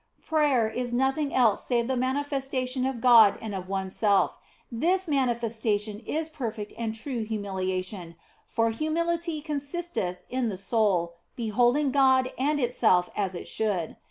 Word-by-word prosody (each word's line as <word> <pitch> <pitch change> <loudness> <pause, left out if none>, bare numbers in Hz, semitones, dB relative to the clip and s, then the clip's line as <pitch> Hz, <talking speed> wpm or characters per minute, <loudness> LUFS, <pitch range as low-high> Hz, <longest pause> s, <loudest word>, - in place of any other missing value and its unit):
Prayer 290 -8 +2
is 245 +2 -3
nothing 270 +4 +1
else 230 -5 +3
save 240 -2 +1
the 260 +2 -1
manifestation 260 -1 -1
of 260 -3 -4
God 230 -4 +7
and 220 -2 -6
of 185 -1 -6
oneself, 195 +1 +1 0.4
and 230 0 -5
this 370 +2 +2
manifestation 230 -6 -1
is 310 +7 -3
perfect 230 -9 -5
and 225 -1 -3
true 235 0 -4
humilia 190 -4 -2
tion, 180 -4 -8 0.3
for 230 0 +1
humility 330 +4 -1
consisteth 290 - -3
in 250 -2 -1
the 195 - -4
soul, 195 -4 +1 0.2
beholding 245 +5 +2
God 260 -1 +3
and 290 +3 +1
itself 225 -8 +2
as 195 -3 -1
it - - -7
should. 200 -7 -1
240 Hz, 145 wpm, -27 LUFS, 210-275 Hz, 0.4 s, God